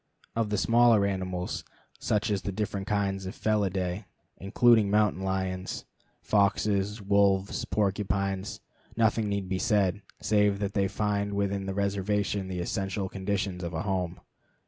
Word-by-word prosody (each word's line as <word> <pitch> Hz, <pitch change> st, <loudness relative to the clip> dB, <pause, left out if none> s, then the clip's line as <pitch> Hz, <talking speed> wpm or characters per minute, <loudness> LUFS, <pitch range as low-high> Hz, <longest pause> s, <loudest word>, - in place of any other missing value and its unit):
Of 115 Hz, -2 st, 0 dB
the 105 Hz, -, 0 dB
smaller 115 Hz, -1 st, +5 dB
animals, 95 Hz, -2 st, -3 dB, 0.4 s
such 105 Hz, +1 st, 0 dB
as 100 Hz, -2 st, 0 dB
the 100 Hz, -, -3 dB
different 100 Hz, -1 st, -3 dB
kinds 100 Hz, -2 st, -1 dB
of 95 Hz, -, -8 dB
the -, -, -1 dB
Felidæ, 95 Hz, -2 st, 0 dB, 0.3 s
including 110 Hz, +2 st, +4 dB
mountain 105 Hz, -2 st, +2 dB
lions, 95 Hz, -1 st, -2 dB, 0.4 s
foxes, 100 Hz, 0 st, +1 dB
wolves, 100 Hz, -1 st, +2 dB
porcupines, 100 Hz, -1 st, -1 dB, 0.4 s
nothing 110 Hz, -1 st, +2 dB
need 100 Hz, -2 st, -2 dB
be 95 Hz, 0 st, -1 dB
said, 105 Hz, -3 st, +2 dB, 0.2 s
save 105 Hz, -1 st, +2 dB
that 100 Hz, 0 st, -3 dB
they 100 Hz, -1 st, +2 dB
find 100 Hz, 0 st, -1 dB
within 100 Hz, -1 st, -1 dB
the 95 Hz, -, -3 dB
reservation 100 Hz, 0 st, 0 dB
the 90 Hz, -2 st, -3 dB
essential 95 Hz, +2 st, -2 dB
conditions 95 Hz, -1 st, -2 dB
of 85 Hz, -1 st, -4 dB
a 80 Hz, -, -2 dB
home. 90 Hz, -3 st, -2 dB
100 Hz, 145 wpm, -28 LUFS, 95-105 Hz, 0.4 s, smaller